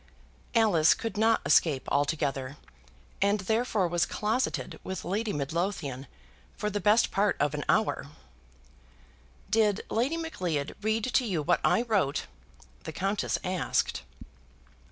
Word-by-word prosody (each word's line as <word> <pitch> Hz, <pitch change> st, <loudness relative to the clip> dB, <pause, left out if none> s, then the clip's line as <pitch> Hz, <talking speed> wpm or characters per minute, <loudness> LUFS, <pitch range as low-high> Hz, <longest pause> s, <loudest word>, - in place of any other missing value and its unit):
Alice 200 Hz, -9 st, +5 dB
could 225 Hz, -, -5 dB
not 225 Hz, +2 st, +3 dB
escape 145 Hz, -6 st, +3 dB
altogether, 140 Hz, -2 st, -1 dB, 0.6 s
and 200 Hz, +1 st, +2 dB
therefore 220 Hz, -1 st, +1 dB
was 170 Hz, 0 st, +1 dB
closeted 220 Hz, +5 st, -2 dB
with 190 Hz, -1 st, -5 dB
Lady 205 Hz, +5 st, -1 dB
Midlothian 145 Hz, -3 st, -3 dB, 0.5 s
for 210 Hz, -, -2 dB
the 205 Hz, -, -1 dB
best 210 Hz, +5 st, +4 dB
part 200 Hz, +1 st, +1 dB
of 145 Hz, 0 st, +1 dB
an 150 Hz, 0 st, -3 dB
hour. 215 Hz, -9 st, +1 dB, 1.4 s
"Did 215 Hz, -2 st, +2 dB
Lady 260 Hz, +9 st, +1 dB
Macleod 180 Hz, -, -3 dB
read 220 Hz, +1 st, 0 dB
to 255 Hz, +1 st, +2 dB
you 170 Hz, -7 st, -1 dB
what -, -, +2 dB
I 235 Hz, -, +3 dB
wrote?" 200 Hz, -, 0 dB, 0.6 s
the -, -, -6 dB
Countess 195 Hz, +5 st, -1 dB
asked. 185 Hz, -2 st, -1 dB
195 Hz, 125 wpm, -28 LUFS, 155-220 Hz, 1.4 s, Alice